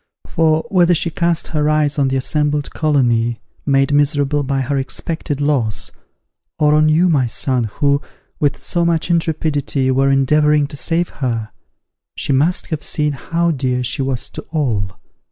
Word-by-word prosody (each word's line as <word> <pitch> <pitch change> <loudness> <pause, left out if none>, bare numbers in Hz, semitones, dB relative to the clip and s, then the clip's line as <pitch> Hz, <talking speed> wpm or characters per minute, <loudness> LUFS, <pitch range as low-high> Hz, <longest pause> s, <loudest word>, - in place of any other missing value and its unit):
For, 160 +1 +1
whether 175 -2 +4
she 165 +1 0
cast 170 0 -1
her 150 -1 0
eyes 150 -1 +1
on 140 - +3
the 135 - -1
assembled 150 +2 0
colony, 120 -6 +1 0.3
made 135 0 +2
miserable 145 0 +2
by 135 -1 -1
her 135 +2 -2
expected 145 +2 -4
loss, 135 -8 0 0.7
or 150 -1 +3
on 155 0 +4
you, 165 +4 +4
my 140 -7 +2
son, 125 +1 0
who, 140 +6 0 0.4
with 145 -2 0
so 175 - -1
much 170 0 0
intrepidity, 150 -5 0
were 135 +1 +2
endeavouring 150 +2 +3
to - - -7
save 170 +4 0
her, 115 -5 -3 0.6
she 140 - 0
must 155 +7 +2
have 155 - -3
seen 150 -1 -1
how 165 +5 -1
dear 130 -3 -1
she 125 +2 -1
was 130 -2 -2
to - - -7
all. 110 - -2
145 Hz, 160 wpm, -18 LUFS, 130-155 Hz, 0.7 s, whether